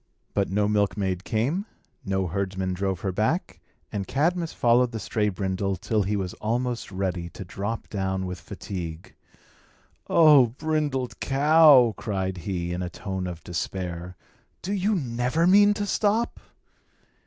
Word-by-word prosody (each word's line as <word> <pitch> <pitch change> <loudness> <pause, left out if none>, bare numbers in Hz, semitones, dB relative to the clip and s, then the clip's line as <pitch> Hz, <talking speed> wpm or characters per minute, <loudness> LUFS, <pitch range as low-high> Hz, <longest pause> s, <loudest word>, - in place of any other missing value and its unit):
But 100 -1 0
no 105 +2 +1
milkmaid 100 -3 0
came; 140 - -1 0.4
no 95 -1 -1
herdsman 95 +1 -2
drove 95 -1 -2
her 95 - -1
back; 110 - -1 0.3
and 100 -2 -3
Cadmus 165 +4 0
followed 120 +1 +3
the 110 - -3
stray 105 +1 0
brindle 95 0 -2
till 105 +4 0
he 100 +2 -1
was 95 -3 -3
almost 120 +1 -2
ready 95 -3 -2
to 95 - -9
drop 105 +5 -4
down 95 -2 -2
with 90 0 -5
fatigue. 85 -4 -7 1.0
"O 150 -6 +7
brindled 145 -1 -2
cow," 140 -3 +6
cried 95 -3 -2
he, 85 -1 -3
in 90 - -3
a 90 - -3
tone 95 -1 -4
of 85 -3 -7
despair, 90 0 -4 0.5
"do 195 - -2
you 205 +2 +1
never 125 +1 0
mean 205 +3 +6
to 205 - -2
stop?" 215 +3 0
105 Hz, 140 wpm, -25 LUFS, 95-135 Hz, 1.0 s, O